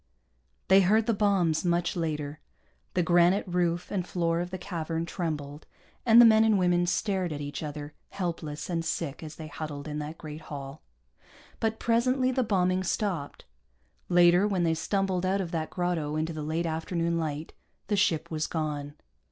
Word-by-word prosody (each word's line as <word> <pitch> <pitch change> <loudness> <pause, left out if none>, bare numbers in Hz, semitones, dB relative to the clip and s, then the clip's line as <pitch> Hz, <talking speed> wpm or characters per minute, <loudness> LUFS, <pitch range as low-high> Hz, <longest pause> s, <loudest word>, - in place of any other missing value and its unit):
They 190 +1 +7
heard 215 +4 +3
the 230 - +2
bombs, 195 -6 +2
much 175 -1 +1
later. 155 -3 -3 0.6
The 180 - +3
granite 175 +3 +4
roof 175 -1 0
and 190 -3 0
floor 170 -2 0
of 175 +1 -3
the 185 - -5
cavern 165 -2 -3
trembled, 150 -4 -4 0.4
and 230 +1 +8
the 240 - +10
men 220 -1 +6
and 220 -2 +4
women 175 -1 +2
stared 185 -2 0
at 145 - -4
each 145 0 -5
other, 150 -1 -6 0.2
helpless 165 -5 -4
and 170 -2 -1
sick 160 -3 -3
as 155 -1 -8
they 160 - -8
huddled 150 -1 -6
in 150 0 -4
that 150 +2 -6
great 155 0 -8
hall. 140 -2 -8 0.8
But 225 0 0
presently 255 +3 +2
the 260 0 +1
bombing 185 -4 +1
stopped. 180 -6 -2 0.6
Later, 175 +2 +5
when 190 -4 0
they 165 -1 +2
stumbled 185 +2 -1
out 190 +2 +1
of 180 -3 -3
that 160 -2 -2
grotto 175 -4 -1
into 160 +1 -1
the 155 - -5
late 160 +3 -1
afternoon 165 +1 -1
light, 155 -1 -4 0.3
the 205 - 0
ship 170 -6 +1
was 155 0 -1
gone. 150 -3 -3
170 Hz, 175 wpm, -28 LUFS, 155-185 Hz, 0.8 s, the